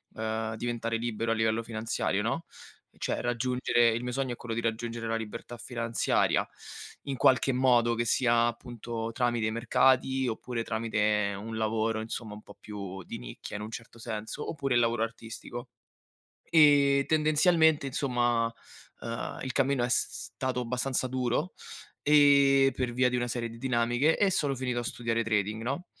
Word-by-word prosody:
ehm, 110 Hz, 0 st, -2 dB
diventare 115 Hz, -1 st, -2 dB
libero 115 Hz, -1 st, -2 dB
a -, -, +4 dB
livello 110 Hz, 0 st, +1 dB
finanziario, 110 Hz, -2 st, -2 dB
no? 115 Hz, +10 st, -2 dB, 0.5 s
Cioè -, -, -2 dB
raggiungere 120 Hz, -1 st, +2 dB
il 115 Hz, +1 st, -1 dB
mio 125 Hz, 0 st, -3 dB
sogno 135 Hz, -1 st, -1 dB
è -, -, -3 dB
quello 115 Hz, -2 st, -5 dB
di 115 Hz, -, -1 dB
raggiungere 115 Hz, 0 st, -3 dB
la 115 Hz, 0 st, 0 dB
libertà 115 Hz, +2 st, -7 dB
finanziaria 115 Hz, -1 st, 0 dB, 0.6 s
in 135 Hz, -1 st, -2 dB
qualche 130 Hz, +1 st, +4 dB
modo, 125 Hz, -2 st, +3 dB
che 120 Hz, 0 st, -1 dB
sia 120 Hz, 0 st, +3 dB
appunto 115 Hz, -1 st, -5 dB
tramite 120 Hz, -2 st, 0 dB
i -, -, -1 dB
mercati 130 Hz, +3 st, +2 dB
oppure 115 Hz, +1 st, -4 dB
tramite 105 Hz, -2 st, 0 dB
un 110 Hz, +2 st, -6 dB
lavoro 110 Hz, 0 st, 0 dB
insomma 110 Hz, 0 st, -5 dB
un 105 Hz, -, -11 dB
po' 100 Hz, -, -15 dB
più 100 Hz, -3 st, -7 dB
di -, -, -7 dB
nicchia -, -, -8 dB
in 105 Hz, -, -6 dB
un 110 Hz, -, -6 dB
certo 115 Hz, 0 st, -9 dB
senso, 110 Hz, -2 st, -5 dB
oppure 135 Hz, -5 st, -1 dB
il -, -, +5 dB
lavoro 115 Hz, -1 st, +2 dB
artistico. 115 Hz, +2 st, -7 dB, 0.8 s
E 140 Hz, -3 st, +6 dB
tendenzialmente 155 Hz, 0 st, +3 dB
insomma, 120 Hz, -4 st, 0 dB, 0.5 s
ehm, 115 Hz, 0 st, -5 dB
il 130 Hz, -2 st, -3 dB
cammino 135 Hz, -2 st, +1 dB
è -, -, 0 dB
s 125 Hz, -, +1 dB
s -, -, -7 dB
stato 130 Hz, -1 st, -2 dB
abbastanza 125 Hz, +2 st, -1 dB
duro 130 Hz, +6 st, -1 dB, 0.5 s
e 140 Hz, -2 st, +5 dB
per 125 Hz, -2 st, -2 dB
via 125 Hz, +1 st, +3 dB
di -, -, -4 dB
una 120 Hz, 0 st, -1 dB
serie 120 Hz, -1 st, -3 dB
di 115 Hz, -, -11 dB
dinamiche 120 Hz, +4 st, +2 dB
e 200 Hz, -2 st, +3 dB
sono 145 Hz, -4 st, +1 dB
finito 125 Hz, -1 st, -2 dB
a -, -, -4 dB
studiare 115 Hz, -1 st, -1 dB
trading, 110 Hz, 0 st, -1 dB
no? 140 Hz, +9 st, -3 dB
120 Hz, 170 wpm, -29 LUFS, 115-130 Hz, 0.8 s, E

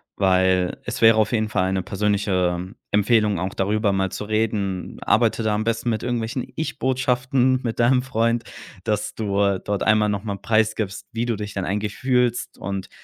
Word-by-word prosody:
weil 95 Hz, -1 st, +2 dB
es 120 Hz, +2 st, -5 dB
wäre 115 Hz, 0 st, +8 dB
auf 110 Hz, -, +2 dB
jeden 110 Hz, -2 st, +1 dB
Fall 95 Hz, -2 st, 0 dB
'ne 95 Hz, -1 st, -1 dB
persönliche 95 Hz, -3 st, 0 dB, 0.2 s
Empfehlung, 105 Hz, -1 st, +3 dB
auch 95 Hz, +3 st, -3 dB
darüber 105 Hz, +2 st, +1 dB
mal 95 Hz, -1 st, 0 dB
zu -, -, -5 dB
reden. 105 Hz, -3 st, -1 dB
Arbeite 115 Hz, 0 st, +2 dB
da 110 Hz, -, +1 dB
am 105 Hz, +1 st, 0 dB
besten 115 Hz, +1 st, 0 dB
mit 110 Hz, -1 st, -2 dB
irgendwelchen 120 Hz, +1 st, -2 dB
Ich 160 Hz, -, -4 dB
Botschaften 130 Hz, 0 st, +1 dB
mit 115 Hz, -1 st, -3 dB
deinem 125 Hz, +2 st, +4 dB
Freund, 115 Hz, -2 st, 0 dB, 0.4 s
dass 105 Hz, -2 st, -1 dB
du 100 Hz, -2 st, 0 dB
dort 100 Hz, -1 st, -1 dB
einmal 110 Hz, -1 st, +3 dB
noch 100 Hz, 0 st, -2 dB
mal 100 Hz, -2 st, -3 dB
preisgibst, 110 Hz, -2 st, 0 dB
wie 115 Hz, +1 st, -2 dB
du 115 Hz, -, 0 dB
dich 105 Hz, -1 st, -6 dB
dann 95 Hz, -2 st, -3 dB
eigentlich 105 Hz, +2 st, -2 dB
fühlst 125 Hz, -2 st, 0 dB
und 100 Hz, 0 st, -5 dB
105 Hz, 180 wpm, -23 LUFS, 100-115 Hz, 0.4 s, wäre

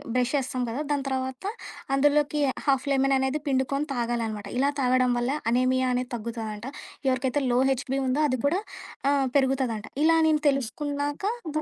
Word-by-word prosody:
Brush 250 Hz, +1 st, +1 dB
చేస్తాం 260 Hz, -2 st, -1 dB
కదా! 255 Hz, +6 st, -3 dB
దాని 285 Hz, -2 st, 0 dB
తర్వాత 260 Hz, +1 st, -3 dB, 0.5 s
అందులోకి 290 Hz, +1 st, +2 dB, 0.2 s
హాఫ్‌‌‌ 270 Hz, -1 st, +2 dB
లెమన్ 270 Hz, 0 st, +3 dB
అనేది 265 Hz, +3 st, -1 dB
పిండుకొని 275 Hz, +2 st, 0 dB
తాగాలనమాట. 230 Hz, -4 st, -2 dB
ఇలా 275 Hz, +2 st, +3 dB
తాగడం 255 Hz, 0 st, +3 dB
వల్ల 240 Hz, +3 st, 0 dB, 0.2 s
అనేమియా 255 Hz, +1 st, +2 dB
అనేది 250 Hz, 0 st, -2 dB
తగ్గుతదంట. 225 Hz, -1 st, -5 dB, 0.4 s
ఎవరికైతే 260 Hz, +2 st, 0 dB
లో 245 Hz, -, +3 dB
హెచ్‌బి 265 Hz, +1 st, -1 dB
ఉందో 265 Hz, +4 st, +1 dB
అది 255 Hz, -1 st, 0 dB
కూడా 350 Hz, +7 st, +1 dB, 0.5 s
ఆహ్, 275 Hz, -2 st, +2 dB
పెరుగుతదంటా. 260 Hz, -5 st, 0 dB
ఇలా 325 Hz, +1 st, +5 dB
నేను 305 Hz, -1 st, +2 dB
తెలుసుకున్నాకా 285 Hz, -, -2 dB, 0.2 s
దా 310 Hz, -, +1 dB
265 Hz, 150 wpm, -26 LUFS, 250-285 Hz, 0.5 s, ఇలా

